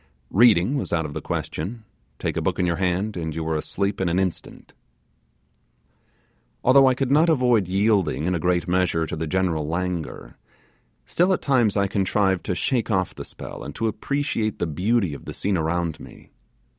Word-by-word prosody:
Reading 115 +3 +4
was - - -3
out 80 -2 0
of 75 - -6
the - - -4
question; 110 +9 -4 0.3
take - - -3
a - - -1
book - - -1
in 90 - +1
your 85 -1 0
hand, 95 +3 -1
and 80 -3 -4
you 80 - -3
were 80 0 -1
asleep 100 +6 -2
in 95 - +1
an 85 - 0
instant. 95 -2 -4 1.9
Although 135 +1 +6
I 130 - +3
could 135 0 -1
not 155 +4 +5
avoid 125 - +3
yielding 95 -5 +1
in 90 - +1
a 85 - -1
great 90 +2 0
measure 90 -2 +1
to 75 - -5
the 80 +1 -3
general 85 -3 0
languor, 85 -6 -4 0.7
still 180 +3 +2
at - - -2
times 120 -8 +2
I 100 - +3
contrived 95 -1 +1
to 90 - 0
shake 120 +8 0
off 95 -5 0
the - - -7
spell, - - -9
and - - -8
to 115 - -2
appreciate 115 -1 -1
the - - -1
beauty 95 +3 0
of 70 - -9
the - - -7
scene 100 0 -1
around 80 -1 -1
me. - - -14
95 Hz, 190 wpm, -23 LUFS, 85-115 Hz, 1.9 s, Although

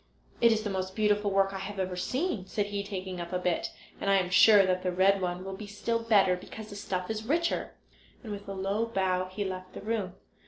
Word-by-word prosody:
"It 235 -1 +7
is 220 -1 +1
the 210 - -2
most 190 0 -3
beautiful 210 -1 +2
work 195 0 +2
I 195 - -4
have 200 +1 -6
ever 185 -1 -2
seen," 245 - -2
said 205 +1 -1
he, 205 0 -3
taking 190 -3 -5
up 170 0 -6
a 180 - 0
bit. 180 -2 0 0.3
"And 200 - -1
I 195 - +5
am 180 -2 +1
sure 205 0 +7
that 185 0 +1
the 185 - -1
red 190 +2 +3
one 180 0 -2
will 195 - -5
be 210 +1 -8
still 230 +3 -1
better, 210 -5 +4
because 215 +4 -9
the - - -7
stuff 185 -1 -3
is 220 0 -3
richer," 335 +7 0 0.5
and 220 - -7
with 200 -1 -7
a - - -3
low 195 +4 -1
bow 185 -4 0
he 190 +2 -3
left 185 -1 -6
the - - -7
room. 205 -4 -2
195 Hz, 240 wpm, -29 LUFS, 185-210 Hz, 0.5 s, It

